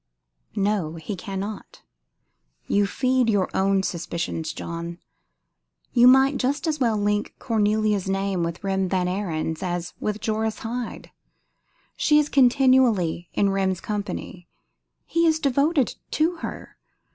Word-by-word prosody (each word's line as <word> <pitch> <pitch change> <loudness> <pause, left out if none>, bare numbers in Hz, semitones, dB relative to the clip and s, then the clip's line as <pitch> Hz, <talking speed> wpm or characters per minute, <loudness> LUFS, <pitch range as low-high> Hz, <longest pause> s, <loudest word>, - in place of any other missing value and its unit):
No, 195 -6 0
he 165 +5 -5
cannot. 195 +3 -6 0.8
You 200 0 +2
feed 255 +1 +1
your 200 -4 +1
own 195 0 +2
suspicions, 165 -2 -3
John. 170 0 -6 1.0
You 245 0 +6
might 265 +2 +6
just 285 +5 -1
as 310 -2 -1
well 230 -4 +2
link 205 0 -1
Cornelia's 215 -3 +1
name 195 -1 -1
with 170 +2 -3
Rem 190 -1 0
Van 185 -1 +1
Ariens 165 -4 -2
as 175 -1 -3
with 210 0 -2
Joris 220 0 -1
Hyde. 240 +1 -5 0.9
She 300 - +4
is 300 0 +2
continually 250 - +3
in 200 -1 +2
Rem's 190 -2 0
company. 200 -3 -5 0.6
He 335 0 +2
is 315 -1 +3
devoted 280 -1 +1 0.2
to 330 +3 +1
her. - - -8
205 Hz, 125 wpm, -24 LUFS, 185-255 Hz, 1.0 s, You